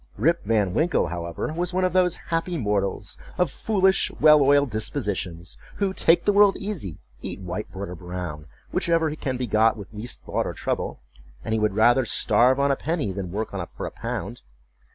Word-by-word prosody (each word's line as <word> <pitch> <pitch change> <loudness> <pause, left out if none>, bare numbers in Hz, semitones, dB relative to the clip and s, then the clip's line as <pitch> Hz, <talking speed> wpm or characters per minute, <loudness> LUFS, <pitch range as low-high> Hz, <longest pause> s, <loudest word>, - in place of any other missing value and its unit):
Rip 165 +8 +2
Van 105 -4 +1
Winkle, 160 - +1
however, 85 - -4
was 175 +2 -2
one 185 - +2
of 185 -2 +1
those 180 -2 +3
happy 165 +1 -1
mortals, 105 -4 -2 0.2
of 180 -6 +1
foolish, 190 0 +2
well 150 0 +7
oiled 140 -1 +4
dispositions, 100 - -2 0.2
who 195 -2 -1
take 170 -2 +3
the 205 - +3
world 205 -1 +5
easy, 180 - -4 0.2
eat - - -5
white 95 +2 -5
bread 95 +1 -6
or - - -6
brown, 90 -3 -6 0.2
whichever 165 -2 +1
can 130 -4 -3
be 125 - -2
got 110 0 +3
with 100 0 -10
least 110 +3 -5
thought - - -2
or - - -4
trouble, - - -3 0.4
and 110 - 0
would 105 -2 +1
rather 120 +4 +5
starve 125 +3 +3
on 140 0 +3
a - - +2
penny 155 - -2
than 95 -2 -5
work 110 +3 -3 0.3
for - - -4
a - - -5
pound. - - -5
120 Hz, 185 wpm, -24 LUFS, -, 0.4 s, well